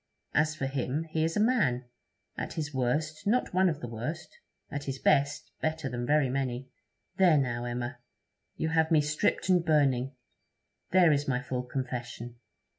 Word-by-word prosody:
As 155 +1 +2
for 140 - -2
him, 135 +2 -1
he 160 0 +1
is 165 +3 0
a - - +2
man; 210 - +2 0.5
at - - -4
his 150 -3 -4
worst, 150 - -1
not 240 0 +1
one 185 0 +4
of 155 -3 -3
the 120 - -4
worst; 125 +9 -5 0.4
at 145 0 -4
his 135 -1 -3
best, 140 +2 +2
better 155 -3 -1
than 120 0 -3
very 150 -1 +4
many. 130 -1 -2 0.5
There, 180 -5 +6
now, 120 -3 0
Emma, 120 +1 -4 0.6
you 160 - -1
have 160 0 +2
me 160 -3 +5
stripped 150 +3 0
and 180 -2 +4
burning; 135 -5 +2 0.7
there 175 -2 +6
is 145 0 +1
my 125 -2 +1
full 125 -1 -3
confession. 120 -2 -5
145 Hz, 170 wpm, -29 LUFS, 125-160 Hz, 0.7 s, There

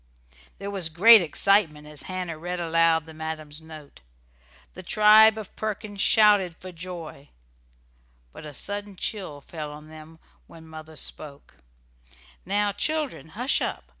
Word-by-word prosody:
There 200 0 -6
was 190 -5 -2
great 210 +7 +7
excitement 170 -2 +1
as 150 -1 -9
Hannah 180 -4 -5
read 175 +2 -4
aloud 165 -1 +2
the 160 - -12
madam's 155 -1 -5
note. 155 - -13 0.7
The 185 - -9
tribe 215 +3 +6
of 215 -3 -9
Perkins 215 -1 -4
shouted 205 -5 +4
for 185 - -10
joy, 170 -4 -9 1.0
but - - -11
a 150 - -8
sudden 205 0 -6
chill 180 -6 -5
fell 150 0 -7
on 150 +1 -12
them 155 +1 -13 0.3
when 160 -1 -15
mother 160 0 -11
spoke: 145 -1 -8 0.9
"Now, 205 +1 +1
children, 310 - -2
hush 250 +4 +1
up! - - -3
170 Hz, 135 wpm, -25 LUFS, 155-205 Hz, 1.0 s, great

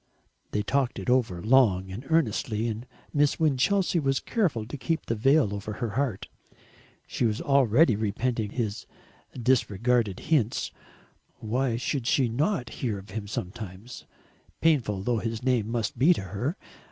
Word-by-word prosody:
They 105 - -1
talked 130 +2 0
it 125 - -1
over 110 -9 +1
long 105 -7 +3
and 120 +8 -7
earnestly, 115 -7 +1
and 115 +2 -5 0.3
Miss 145 -1 +2
Winchelsea 165 +5 +2
was 135 -3 +1
careful 160 - -1
to 120 - -7
keep 160 +4 -2
the - - -1
veil 130 0 +3
over 100 +1 -5
her 115 0 -3
heart. 115 -5 -2 0.8
She - - -3
was 110 -2 +1
already 135 -1 +4
repenting 110 +1 -1
his 110 -2 -3 0.5
disregarded 120 -3 +1
hints. 140 -8 0 0.6
Why 120 +2 -1
should 125 0 -2
she 130 -1 +3
not 135 - 0
hear 115 -6 -1
of 95 0 -11
him 105 0 -5
sometimes 100 +3 -7 0.5
painful 120 -12 +2
though 120 0 +1
his 115 +1 -4
name 120 -4 +1
must 115 -1 -2
be 165 +7 +6
to - - -4
her? 115 - -3
120 Hz, 150 wpm, -27 LUFS, 105-135 Hz, 0.8 s, be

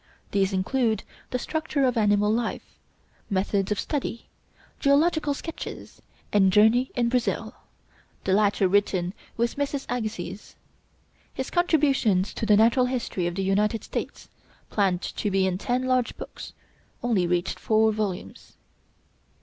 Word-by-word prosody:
These 195 -1 +2
include 220 +3 0 0.3
'The 250 - -1
Structure 310 +1 -2
of 250 - +1
Animal 210 -1 +3
Life,' 230 0 -3 0.5
'Methods 195 0 0
of 210 - 0
Study,' 270 -6 -3 0.5
'Geological 295 +1 +3
Sketches,' 330 +3 -8 0.3
and 195 -2 +5
'Journey 220 +6 +4
in 240 -1 +2
Brazil,' 245 0 -1 0.7
the 190 - +1
latter 205 -1 +3
written 185 -2 +1 0.2
with 235 +3 0
Mrs. 285 -1 -2
Agassiz. 220 -3 -5 0.8
His 265 - -4
'Contributions 275 - +2
to 220 - -3
the 210 -1 +6
Natural 235 +3 +4
History 235 -8 -2
of 175 - -3
the 195 - -1
United 210 +3 +1
States,' - - -5 0.4
planned 190 -3 +1
to 210 - -2
be 190 -1 +2
in 185 -1 -1
ten 245 +4 0
large 255 -1 0
books, - - -9 0.5
only 210 -8 +2
reached 175 +1 -1
four 220 0 +3
volumes. 210 -4 -4
220 Hz, 135 wpm, -26 LUFS, 195-255 Hz, 0.8 s, the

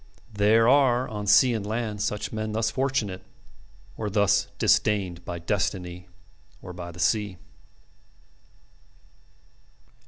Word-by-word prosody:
There 105 +3 +4
are 130 -2 +4
on 105 -1 -6
sea 125 +4 +5
and 110 -3 -2
land 110 -1 -3
such 105 +1 -3
men 110 0 -3
thus 110 0 0
fortunate 130 -8 -2 0.7
or 105 -2 -4
thus 100 -1 +2
disdained 95 -5 +1
by 85 - -5
destiny 90 0 -3 0.5
or 90 - -10
by 85 0 -8
the 85 - -13
sea. 105 -1 0
105 Hz, 115 wpm, -25 LUFS, 95-115 Hz, 0.7 s, sea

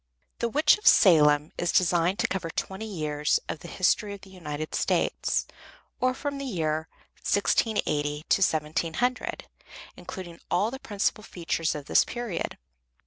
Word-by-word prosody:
The 235 - 0
"Witch 300 - +4
of 420 - -3
Salem" 150 -5 +6
is 175 - +1
designed 175 0 +2
to - - +1
cover 185 -4 -3
twenty 190 +6 -4
years 150 -6 0
in - - -3
the 170 - -11
history 200 +3 +1
of 200 - -14
the 195 - -14
United 155 -4 -6
States, - - 0 0.5
or 255 0 +1
from 285 0 -4
the 275 - -4
year 160 - -1 0.3
1680 150 -8 0
to - - +3
1700, 165 +9 0 0.5
including 175 -3 -9
all 205 +6 +1
the 265 - -6
principal 210 -2 -1
features 165 -5 -2
of 145 -2 -6
this - - +4
period. 240 -8 -4
180 Hz, 145 wpm, -27 LUFS, 155-215 Hz, 0.5 s, Salem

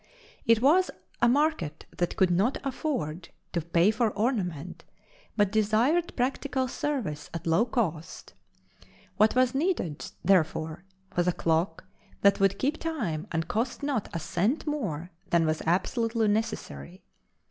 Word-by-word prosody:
It 230 0 +4
was 360 +7 +5 0.3
a 240 - +5
market 275 - 0
that 175 - -1
could 185 -2 +3
not 200 +9 +2
afford 250 - -3 0.2
to 170 - 0
pay 170 +5 +3
for 220 +1 +1
ornament 200 - -2 0.5
but 205 -2 +3
desired 220 +11 +2
practical 260 +1 -1
service 240 - -3
at 165 - -5
low 165 +7 +3
cost. 170 - -3 0.8
What 215 +2 +4
was 255 -1 +3
needed, 275 - -1 0.2
therefore, 160 -2 +1 0.3
was 175 0 +1
a - - +5
clock 165 +1 0 0.4
that 200 0 +5
would 195 0 +3
keep 285 +7 0
time 215 - -3
and 165 -1 -1
cost 235 - -2
not 275 -7 -1
a - - -3
cent 190 - 0
more 190 - -3 0.2
than 170 -1 +3
was 155 0 0
absolutely 225 +5 +1
necessary. 210 -4 -3
210 Hz, 135 wpm, -28 LUFS, 170-255 Hz, 0.8 s, was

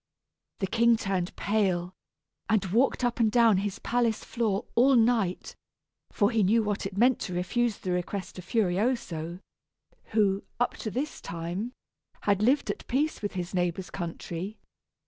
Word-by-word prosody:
The - - +2
king 230 +3 +3
turned 190 -4 -2
pale, 190 -4 0 0.6
and 215 -3 +3
walked 235 +7 +2
up 245 0 0
and 220 -2 +3
down 230 -3 +5
his 200 0 -2
palace 235 -2 0
floor 225 -3 -1
all 260 +3 +5
night, 225 -6 +2 0.5
for 205 +1 +2
he 225 -2 +2
knew 220 +4 +4
what 205 -2 -1
it 195 0 -10
meant 245 +3 +4
to 180 - -4
refuse 225 +5 0
the 185 - -4
request 180 +1 -3
of 180 - -10
Furioso, 185 -5 -1 0.6
who, 205 -3 +2 0.2
up 245 - +1
to 220 - -4
this 270 +8 -3
time, 175 +8 -4 0.5
had 205 -1 +2
lived 260 +6 +3
at - - -9
peace 295 +5 0
with 205 - -3
his 180 -1 -4
neighbor's 180 0 -1
country. 175 +2 -5
205 Hz, 155 wpm, -28 LUFS, 185-235 Hz, 0.6 s, down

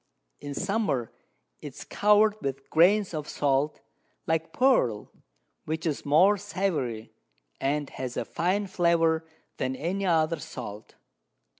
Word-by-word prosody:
In 145 -1 -7
Summer 195 - -1 0.5
it - - -8
is - - -8
cover'd 210 +1 +3
with 135 0 -5
Grains 185 +4 +4
of 150 -1 -4
Salt, 140 +1 0 0.4
like 160 0 -1
Pearl, 160 - +2 0.5
which 160 +2 -3
is 150 -3 -2
more 180 +8 +5
savoury, 175 - -3 0.5
and 145 +1 -1
has 130 -1 -5
a - - -1
finer 190 +4 0
Flavour 165 -3 +2 0.3
than 130 0 -2
any 190 +7 -2
other 165 -1 +2
Salt. 110 -9 -8
160 Hz, 125 wpm, -27 LUFS, 140-195 Hz, 0.5 s, more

